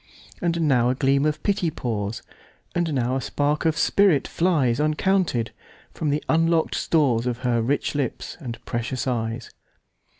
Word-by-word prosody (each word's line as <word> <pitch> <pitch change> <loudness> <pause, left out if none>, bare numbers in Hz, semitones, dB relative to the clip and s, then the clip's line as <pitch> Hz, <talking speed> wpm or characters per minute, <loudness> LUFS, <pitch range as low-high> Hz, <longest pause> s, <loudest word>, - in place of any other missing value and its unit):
And 170 -1 0
now 125 -6 +3
a 130 - +1
gleam 140 +2 +2
of 155 0 -2
pity 200 -4 +1
pours, 110 -7 -3 0.5
And 175 -2 0
now 125 0 0
a - - -3
spark 145 +4 -1
of 160 0 +2
spirit 185 -3 +3
flies, 150 -9 +1
Uncounted, 155 - +1 0.4
from 155 - -2
the 145 +1 0
unlock'd 165 0 +2
storesOf 125 -6 +1
her 120 -2 +1
rich 135 +6 0
lips 140 -5 -3
and 120 -6 -6
precious 120 +1 -3
eyes. 115 -1 -3
140 Hz, 145 wpm, -24 LUFS, 120-160 Hz, 0.5 s, now